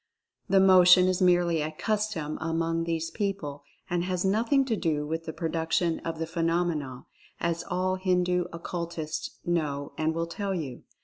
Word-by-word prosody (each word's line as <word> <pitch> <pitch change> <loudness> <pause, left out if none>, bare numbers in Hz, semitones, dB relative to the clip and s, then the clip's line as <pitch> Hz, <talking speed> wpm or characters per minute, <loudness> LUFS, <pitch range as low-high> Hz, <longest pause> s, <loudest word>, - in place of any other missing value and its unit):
The 195 - +5
motion 185 -1 +7
is 185 +1 0
merely 175 -3 +3
a 155 +1 -2
custom 205 -5 -2
among 165 0 -1
these 165 -1 -2
people 195 -9 -3 0.3
and 175 0 0
has 180 0 -1
nothing 230 +8 +2
to 235 -4 0
do 155 -6 -1
with 165 +2 -3
the 160 - -4
produc 165 0 -3
tion 170 -2 +2
of 165 -1 -5
the 165 - -2
phenomena, 165 -5 -1 0.3
as 170 0 -1
all 185 0 0
Hindu 180 -1 +1
Occultists 170 -2 -5
know 150 -5 -1
and 160 +1 0
will 165 0 -1
tell 195 +3 -3
you. 140 -8 -5
170 Hz, 165 wpm, -28 LUFS, 160-185 Hz, 0.3 s, motion